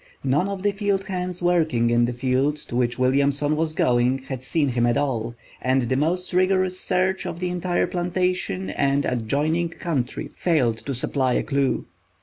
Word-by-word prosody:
None 140 +7 +2
of 195 -1 -5
the 205 - +3
field 200 -1 0
hands 180 -2 -4
working 160 -10 +2
in 120 0 +4
the 120 - -1
field 130 +4 +1
to 150 -5 -8
which 120 -1 +1
Williamson 140 +3 +2
was 155 0 -1
going 125 -2 +2
had 130 -1 -7
seen 145 +2 0
him 120 -1 +1
at 120 - +2
all, 120 -5 -1 0.3
and 130 0 +2
the 120 +2 0
most 175 +7 0
rigorous 185 0 +2
search 185 +1 0
of 170 - -5
the 180 0 -1
entire 180 0 0
plantation 180 - -1
and 140 +4 +1
adjoining 145 +8 0
country 150 -7 -3
failed 130 -10 +1
to 135 - -2
supply 130 +1 0
a - - +1
clew. 140 -2 0
145 Hz, 175 wpm, -23 LUFS, 125-180 Hz, 0.3 s, in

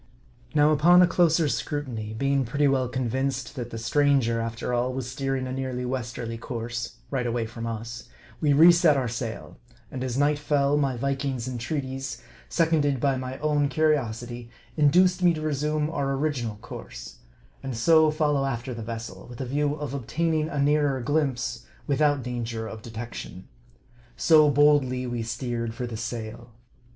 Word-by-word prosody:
Now, 150 0 +5
upon 175 +4 +6
a - - +5
closer 170 -2 +3
scrutiny, 120 -6 -3
being 140 +3 +1
pretty 145 +4 +1
well 130 -2 +1
convinced 130 +1 -2
that 120 -3 -5
the 115 - -6
stranger, 115 -1 +2
after 115 +2 -3
all, 120 +1 +1
was 130 -2 -4
steering 135 0 -2
a 130 - -5
nearly 130 -1 -3
westerly 120 -2 -4
course 120 0 -5 0.2
right 125 -3 -1
away 120 -1 -1
from 115 +1 -6
us 115 +2 -6 0.3
we 150 -2 +3
reset 165 0 +6
our 130 -2 0
sail; 115 -1 -5 0.3
and 130 - -4
as 130 -1 -2
night 145 +1 +2
fell, 145 -1 +2
my 135 -4 +1
Viking's 135 -1 -2
entreaties, 130 +2 -4 0.3
seconded 155 -5 +2
by 135 +1 +2
my 130 0 -5
own 150 -2 +2
curi 155 +1 +3
osity, 120 -2 -5 0.3
induced 180 +5 +4
me 175 -2 +4
to 155 - -5
resume 150 0 0
our 140 -4 -1
original 135 -7 -2
course; - - -9 0.4
and 135 -4 -5
so 160 +5 +5
fol 155 -1 +1
low 135 -1 +1
after 125 -1 -3
the 115 - -6
vessel, 115 -4 -7
with 120 -1 -11
a 135 - -3
view 145 +3 0
of 150 -2 -5
obtaining 155 +4 -1
a 145 - -5
nearer 145 -1 +2
glimpse, 125 -3 -1 0.2
without 145 -1 +2
danger 115 -2 -4
of 110 0 -8
detection. 115 -5 -8 0.7
So, 155 -2 +6
boldly 140 -3 +3
we 120 -1 -3
steer 120 +1 -3
ed 115 0 -5
for 125 0 -3
the 120 -2 -6
sail. 115 +1 -6
130 Hz, 165 wpm, -26 LUFS, 120-145 Hz, 0.7 s, upon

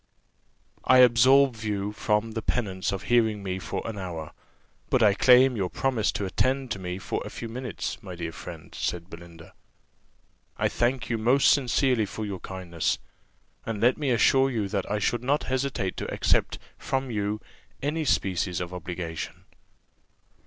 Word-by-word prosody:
"I 130 - +5
absolve 125 0 +5
you 105 -1 -2
from 105 +1 0
the 115 0 -3
penance 100 -5 -1
of 95 - -4
hearing 110 -4 +2
me 95 -1 -3
for 95 - -4
an 110 -3 -5
hour, 85 -4 -6 0.6
but 125 - +3
I 105 -2 +6
claim 125 +4 +6
your 95 -4 -1
promise 125 -2 0
to 100 - -2
attend 130 +6 0
to 95 - -2
me 90 -1 -4
for 95 - -3
a - - -7
few 115 - -7
minutes, 115 -2 -5
my 95 -5 -8
dear 85 -1 -4
friend," 80 -1 -10
said 90 +1 -3
Belinda: 85 -1 -12 1.0
"I - - +1
thank 120 +1 0
you 115 - 0
most 125 +5 +4
sincerely 125 -4 +2
for 110 +2 -5
your 100 -3 -5
kindness; 90 -3 -2 0.7
and 115 -2 -4
let 120 +4 +4
me 145 -3 0
assure 135 +2 +4
you 110 -6 -1
that 100 -2 -2
I 105 - 0
should 120 +3 0
not 140 +4 +1
hesitate 130 -7 -2
to - - -4
accept - - +1 0.2
from 130 -1 -2
you 105 0 -1 0.4
any 155 +3 -1
species 95 - 0
of 90 0 -5
obligation." 85 -2 -6
110 Hz, 165 wpm, -26 LUFS, 95-125 Hz, 1.0 s, I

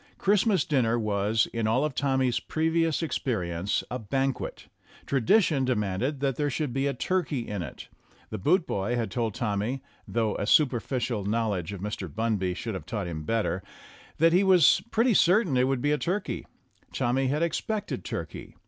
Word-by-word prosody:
Christmas 205 0 +2
dinner 120 -5 +2
was, 105 0 +1
in 115 -2 0
all 125 +6 +2
of 150 - -2
Tommy's 130 -3 +1
previous 165 0 0
experience, 95 - -1
a 125 - -2
banquet. 135 +4 -2 0.4
Tradition 140 - +3
demanded 125 +3 -1
that 135 -3 0
there 145 -1 0
should 140 -1 -2
be 135 +2 0
turkey 140 -2 -1
in 100 -3 -3
it; 75 -6 -8 0.4
the 110 - -4
boot 165 - +3
boy 100 +5 -1
had 115 -2 -2
told 115 -4 -2
Tommy 115 +4 -2 0.2
(though 110 -2 0
a 100 - -2
superficial 125 -5 +2
knowledge 105 -5 -1
of 100 -3 -7
Mr. 105 -2 -4
Bunby 100 -4 -1
should 115 +3 -4
have 95 - -7
taught 105 -4 -3
him 80 -3 -5
better), 110 -3 0 0.6
that 165 +1 +4
he 185 +3 +5
was 185 -2 +5
pretty 230 +2 +3
certain 180 - +4
it 125 0 +3
would 135 -2 0
be 145 +1 +3
turkey; 190 +3 -2 0.4
Tommy 130 +2 0
had 150 +5 0
expected 210 +5 -2
turkey. - - -6
125 Hz, 165 wpm, -27 LUFS, 105-150 Hz, 0.6 s, he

